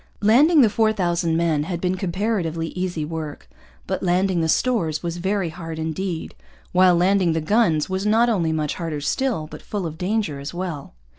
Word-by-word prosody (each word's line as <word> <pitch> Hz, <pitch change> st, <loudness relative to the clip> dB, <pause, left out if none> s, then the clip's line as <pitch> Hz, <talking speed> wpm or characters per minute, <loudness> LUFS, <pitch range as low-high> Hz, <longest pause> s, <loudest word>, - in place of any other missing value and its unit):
Landing 285 Hz, +9 st, +6 dB
the 230 Hz, -, +5 dB
four 220 Hz, 0 st, +3 dB
thousand 175 Hz, -4 st, 0 dB
men 160 Hz, -3 st, +1 dB
had 175 Hz, -1 st, -3 dB
been 180 Hz, +1 st, 0 dB
comparatively 180 Hz, -3 st, -2 dB
easy 180 Hz, -4 st, -3 dB
work. 155 Hz, -, -6 dB, 0.4 s
But -, -, -3 dB
landing 180 Hz, 0 st, +1 dB
the 160 Hz, -, 0 dB
stores 175 Hz, -9 st, +1 dB
was 170 Hz, 0 st, -3 dB
very 190 Hz, 0 st, -1 dB
hard 165 Hz, -1 st, -7 dB
indeed; 160 Hz, +2 st, -3 dB, 0.4 s
while 180 Hz, -1 st, +5 dB
landing 180 Hz, -1 st, +3 dB
the 160 Hz, -, 0 dB
guns 160 Hz, -3 st, +2 dB
was 190 Hz, +1 st, -2 dB
not 220 Hz, +3 st, +3 dB
only 180 Hz, -9 st, +1 dB
much 155 Hz, -2 st, -1 dB
harder 160 Hz, -4 st, -4 dB
still, 240 Hz, -, -1 dB
but 155 Hz, -, -10 dB
full 205 Hz, -4 st, -4 dB
of 160 Hz, 0 st, -6 dB
danger 190 Hz, -6 st, -1 dB
as 140 Hz, +5 st, -7 dB
well. 170 Hz, -, -5 dB
175 Hz, 180 wpm, -22 LUFS, 160-200 Hz, 0.4 s, Landing